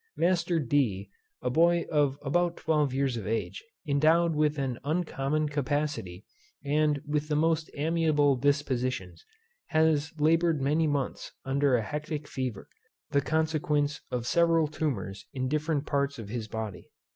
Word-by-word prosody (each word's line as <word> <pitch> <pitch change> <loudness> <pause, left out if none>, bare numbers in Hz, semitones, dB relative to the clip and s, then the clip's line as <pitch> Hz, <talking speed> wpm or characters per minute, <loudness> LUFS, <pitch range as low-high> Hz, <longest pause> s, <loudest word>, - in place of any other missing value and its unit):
Master 170 -1 +2
D. 115 -9 0 0.3
a 125 - 0
boy 170 +4 +3
of 145 -3 +2
about 170 +4 +1
twelve 150 -3 +1
years 135 -2 0
of 105 - -5
age, 105 -5 -2 0.2
endowed 160 +4 +3
with 150 0 +1
an 130 -3 -2
uncommon 155 -1 -1
capacity, 145 -9 -2 0.4
and 150 0 +2
with 150 0 -1
the 150 - 0
most 160 +1 +1
amiable 150 -2 +2
dispositions, 130 - -1 0.4
has 155 -1 +2
laboured 165 +1 +3
many 150 +4 +2
months 145 -3 -2
under 135 0 +2
a 115 - +1
hectic 150 +3 -4
fever, 130 -6 -4 0.4
the 140 - +3
consequence 150 -1 0
of 120 -2 -3
several 165 +2 +3
tumours 105 -11 -3
in 130 -1 -2
different 150 +1 -1
parts 140 0 0
of 110 -3 -8
his 115 -1 -4
body. 110 -4 -6
145 Hz, 140 wpm, -28 LUFS, 130-155 Hz, 0.4 s, boy